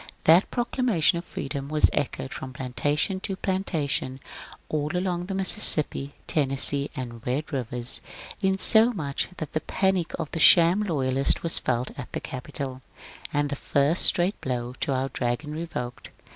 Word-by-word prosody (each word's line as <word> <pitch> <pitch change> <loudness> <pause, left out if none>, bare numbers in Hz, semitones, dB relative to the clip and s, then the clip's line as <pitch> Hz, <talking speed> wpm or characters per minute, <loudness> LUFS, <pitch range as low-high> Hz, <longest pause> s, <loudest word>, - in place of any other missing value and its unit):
That 165 +5 +5
proclama 240 -4 -1
tion 170 +2 +3
of 170 - -10
freedom 140 0 -6
was 155 0 +3
echoed 130 -1 -3
from 130 -1 -8
plantation 145 - -1
to 195 0 -4
plantation 165 -9 -2 0.5
all 150 -1 -2
along 180 -1 -2
the 195 - -4
Mississippi, 160 -7 +5
Tennessee, 140 -1 +2
and 120 -3 -7
Bed 145 +5 -3
rivers, 125 -1 +1 0.4
insomuch 190 - +1
that 155 -3 -7
the 155 - -1
panic 190 0 -1
of 150 - -5
the 165 - -4
sham 170 +4 +6
loyalists 135 -8 0
was 165 - +4
felt 125 0 -2
at 125 - -8
the - - -2
Capitol, 130 0 -6 0.5
aod 145 0 -1
the 140 - -3
first 140 +4 +1
straight 180 +4 +3
blow 125 -2 -3
at 130 - -5
our 135 0 -1
dragon 125 +5 -3
revoked. 150 -6 -6
145 Hz, 150 wpm, -25 LUFS, 130-175 Hz, 0.5 s, sham